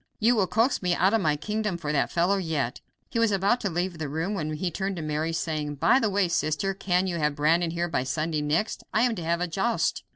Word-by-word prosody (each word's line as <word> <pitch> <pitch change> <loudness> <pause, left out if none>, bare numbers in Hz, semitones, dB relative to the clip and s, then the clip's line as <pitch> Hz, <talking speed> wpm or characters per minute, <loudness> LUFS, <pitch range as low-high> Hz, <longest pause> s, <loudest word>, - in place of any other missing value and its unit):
You 235 +3 +4
will 200 -4 +2
coax 230 +7 +1
me 180 -2 +1
out 190 +4 +3
of 225 - +3
my 155 -4 +2
kingdom 210 +4 -2
for 150 -3 -3
that 140 -2 +1
fellow 180 +4 +2
yet." 155 -8 -2 0.3
He 230 - -1
was 230 -2 +3
about 200 +5 +2
to 200 - -1
leave 175 0 -2
the 155 -3 -3
room 165 +7 -2
when 155 -6 -3
he 175 +3 -2
turned 195 +3 -2
to 165 - -5
Mary, 155 +2 -1
saying: 155 -3 -2
"By 195 - +4
the 225 -4 +1
way, 200 -1 +2
sister, 170 +2 0
can 185 -1 0
you 180 -2 -2
have 150 -2 0
Brandon 165 +3 +2
here 170 +1 -1
by 165 -6 -1
Sunday 155 +3 -1
next? 155 +9 -1
I 220 - +2
am 245 -2 +2
to 180 -6 -5
have 170 +1 0
a 180 - 0
joust." 195 +8 0
175 Hz, 255 wpm, -26 LUFS, 155-200 Hz, 0.3 s, You